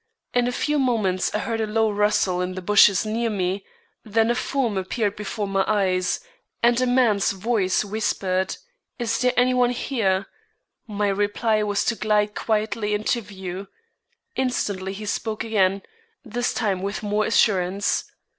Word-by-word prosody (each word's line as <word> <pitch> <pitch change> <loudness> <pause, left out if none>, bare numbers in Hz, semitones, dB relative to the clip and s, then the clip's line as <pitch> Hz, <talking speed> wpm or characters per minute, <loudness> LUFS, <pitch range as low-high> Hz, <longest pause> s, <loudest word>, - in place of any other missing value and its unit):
In 245 0 +2
a - - 0
few 295 +4 0
moments 215 -8 +1
I - - +3
heard 225 +1 -2
a 220 - -1
low 220 0 +1
rustle 205 -3 +1
in 180 0 -3
the 185 - -5
bushes 205 0 +5
near 230 +2 -1
me, 190 -1 -1 0.4
then 225 +2 +2
a - - +3
form 245 -3 -1
appeared 200 +2 -1
before 210 0 -4
my 195 0 +1
eyes, 185 -3 +1 0.4
and 240 +1 +4
a 255 - +2
man's 235 -7 +3
voice 200 -1 0
whispered: 195 -3 -1 0.4
"Is 230 -2 -1
there 250 -1 +3
any 250 +1 +4
one 250 -1 +3
here?" 215 -6 0 0.6
My 205 -1 -1
reply 205 +2 +1
was 205 -1 0
to 235 - +1
glide 210 -1 +1
quietly 215 0 -1
into 215 +3 0
view. 190 -2 -7 0.7
Instantly 200 -7 -1
he 210 +2 -7
spoke 215 +1 -2
again, 200 -3 +1 0.4
this 240 +2 -1
time 200 -6 -1
with 200 +2 -4
more 210 +1 +1
assurance. 195 -3 +2
210 Hz, 155 wpm, -23 LUFS, 195-230 Hz, 0.7 s, bushes